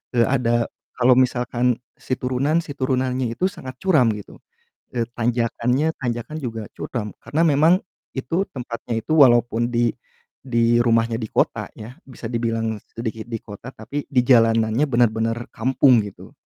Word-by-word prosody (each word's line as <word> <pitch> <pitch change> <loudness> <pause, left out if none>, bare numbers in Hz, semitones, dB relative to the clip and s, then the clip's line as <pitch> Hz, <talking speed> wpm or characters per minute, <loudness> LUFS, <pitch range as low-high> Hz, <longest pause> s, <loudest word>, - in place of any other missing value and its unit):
eee, 120 - +5
ada 120 -3 +1 0.3
kalau 125 0 +5
misalkan 125 -1 +2 0.2
si 130 - -4
turunan 135 +6 +1
si 145 - -7
turunannya 130 -2 0
itu 180 - -1
sangat 130 0 -9
curam 155 -12 +4
gitu, 105 - -10 0.6
e 120 - +1
tanjakannya, 120 +5 +1
tanjakan 120 +4 -3
juga 115 -3 -4 0.2
curam. 105 -4 -4
Karena 155 +3 -1
memang 155 +3 +5 0.4
itu 165 +9 0
tempatnya 120 -2 -5
itu 135 - -2
walaupun 120 -3 +5
di 120 0 +2 0.6
di 120 -1 +3
rumahnya 115 -1 +2
di 110 - -3
kota - - 0
ya, 115 +5 -10
bisa 125 -2 -10
dibilang 115 -2 -1 0.2
sedikit 110 -1 -4
di 115 - -3
kota, 105 +4 -10
tapi 145 0 -5
di 125 -3 +2
jalanannya 115 0 +4
bener-bener 115 -1 +2 0.2
kampung 130 +1 +4
gitu. 100 - -11
120 Hz, 145 wpm, -22 LUFS, 115-130 Hz, 0.6 s, eee